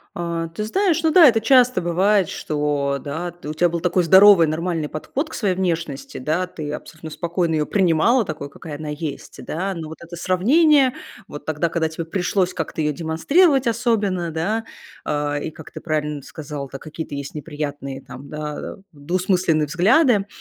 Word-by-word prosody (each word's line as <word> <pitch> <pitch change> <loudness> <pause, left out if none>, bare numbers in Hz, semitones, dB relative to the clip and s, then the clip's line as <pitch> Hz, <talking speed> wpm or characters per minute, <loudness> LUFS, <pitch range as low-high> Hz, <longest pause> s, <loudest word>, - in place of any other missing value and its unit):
А, 170 -1 -3
ты 190 +6 -5
знаешь, 335 - +1
ну 320 - +3
да, 335 -1 +8
это 225 -2 +3
часто 250 +1 +4
бывает, 185 +2 +2
что, 145 -2 -1
да, 165 +4 -5
у 150 - -3
тя 175 +2 +3
был 170 0 -3
такой 180 +1 +2
здоровый, 190 -1 +7
нормальный 160 0 -2
подход 260 - -4
к - - -10
своей 195 -5 0
внешности, 165 -7 -3
да, 155 +7 -1
ты 150 -4 -6
абсолютно 160 +1 -8
спокойно 170 0 -1
её 150 -1 0
принимала 195 +6 +3
такой, 155 -4 -6
какая 150 +1 -8
она 155 +1 -7
есть, 150 -1 -6
да. 190 +4 -3
Но 160 -2 -6
вот 160 - -9
это 170 +1 -10
сравнение, 260 - +3 0.3
вот 145 - -9
тогда, 155 +2 -1
когда 165 -1 0
тебе 160 +1 -5
пришлось 185 +2 -1
как-то - - -4
её 150 -1 +1
демонстрировать 265 - +2
особенно, 210 -7 0
да, 205 +8 -2 0.4
э. 145 0 -1
И - - -6
как 160 0 -12
ты - - -9
правильно 150 -3 -2
сказала, 145 -2 -7
да, 135 - -6
какие-то 155 -1 -7
есть 140 +1 -6
неприятные, 145 -3 -5
там, 130 +3 -11
да, 150 0 -6 0.2
двусмысленные 175 +1 0
взгляды. 205 - +3
165 Hz, 175 wpm, -21 LUFS, 150-195 Hz, 0.4 s, да